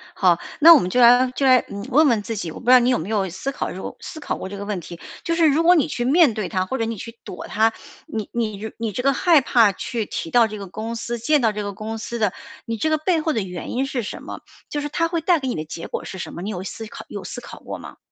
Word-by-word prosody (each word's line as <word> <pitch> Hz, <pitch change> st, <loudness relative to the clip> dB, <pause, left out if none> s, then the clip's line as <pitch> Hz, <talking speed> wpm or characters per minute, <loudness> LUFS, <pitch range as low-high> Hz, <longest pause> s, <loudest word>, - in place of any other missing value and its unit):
好， 180 Hz, -4 st, +4 dB, 0.2 s
那 335 Hz, +3 st, +10 dB
我 295 Hz, -, +7 dB
们 180 Hz, -, -2 dB
就 250 Hz, -, +1 dB
来 245 Hz, +2 st, +6 dB
就 275 Hz, -, 0 dB
来， 255 Hz, -1 st, +7 dB
嗯， 200 Hz, +2 st, -6 dB
问 295 Hz, +4 st, +5 dB
问 230 Hz, -5 st, +2 dB
自 225 Hz, +2 st, -5 dB
己， 175 Hz, -5 st, -4 dB
我 -, -, -9 dB
不 -, -, -14 dB
知 245 Hz, -, +5 dB
道 255 Hz, -, +9 dB
你 245 Hz, -, +2 dB
有 250 Hz, -, +3 dB
没 165 Hz, -, -6 dB
有 200 Hz, -4 st, 0 dB
思 190 Hz, +11 st, -4 dB
考 -, -, -4 dB
这 -, -, -7 dB
个 -, -, -6 dB
思 315 Hz, -, -8 dB
考 290 Hz, -, -3 dB
过 -, -, -6 dB
这 200 Hz, -, -7 dB
个 200 Hz, -, -6 dB
问 205 Hz, -3 st, -3 dB
题， 170 Hz, 0 st, -10 dB, 0.2 s
就 335 Hz, 0 st, 0 dB
是 330 Hz, -2 st, +4 dB
如 305 Hz, +3 st, +3 dB
果 350 Hz, +2 st, +6 dB
你 315 Hz, -, +3 dB
去 240 Hz, -5 st, -3 dB
面 295 Hz, -2 st, +5 dB
对 210 Hz, -4 st, -3 dB
它 185 Hz, 0 st, 0 dB
或 260 Hz, -, -3 dB
者 225 Hz, -, -1 dB
你 225 Hz, -1 st, -4 dB
去 230 Hz, +3 st, -9 dB
躲 180 Hz, -, -8 dB
它， 225 Hz, +1 st, +2 dB, 0.3 s
你 220 Hz, -2 st, -5 dB
你 220 Hz, -2 st, -3 dB
你 225 Hz, -2 st, -2 dB
这 250 Hz, -, -3 dB
个 275 Hz, +2 st, +3 dB
害 325 Hz, 0 st, +4 dB
怕 230 Hz, -5 st, +4 dB
去 225 Hz, +3 st, -4 dB
提 165 Hz, -, -5 dB
到 235 Hz, +1 st, +4 dB
这 215 Hz, -, -7 dB
个 200 Hz, -2 st, -7 dB
公 220 Hz, +5 st, -5 dB
司， 235 Hz, +1 st, -4 dB
见 285 Hz, +5 st, +2 dB
到 225 Hz, -, +3 dB
这 210 Hz, 0 st, -4 dB
个 200 Hz, -1 st, -4 dB
公 220 Hz, +3 st, -5 dB
司 235 Hz, +2 st, -5 dB
的， 210 Hz, -4 st, +2 dB, 0.3 s
你 230 Hz, -1 st, -3 dB
这 270 Hz, +9 st, 0 dB
个 310 Hz, -, +2 dB
背 330 Hz, +1 st, +1 dB
后 315 Hz, 0 st, 0 dB
的 220 Hz, -, 0 dB
原 180 Hz, -2 st, -6 dB
因 260 Hz, +2 st, 0 dB
是 255 Hz, -4 st, -3 dB
什 -, -, -6 dB
么？ -, -, -8 dB, 0.3 s
就 295 Hz, -, -2 dB
是 295 Hz, -, -4 dB
它 330 Hz, +3 st, 0 dB
会 335 Hz, 0 st, -1 dB
带 340 Hz, +1 st, +3 dB
给 265 Hz, -, -4 dB
你 245 Hz, -, -1 dB
的 155 Hz, -, -4 dB
结 165 Hz, +2 st, -7 dB
果 -, -, -5 dB
是 190 Hz, -, -7 dB
什 -, -, -5 dB
么？ 170 Hz, -, -7 dB
你 210 Hz, -, -3 dB
有 185 Hz, -2 st, -5 dB
思 220 Hz, +4 st, -7 dB
考 215 Hz, -, -10 dB
有 -, -, -6 dB
思 -, -, -7 dB
考 -, -, -11 dB
过 -, -, -7 dB
吗？ -, -, -11 dB
230 Hz, 335 characters per minute, -22 LUFS, 205-275 Hz, 0.3 s, 那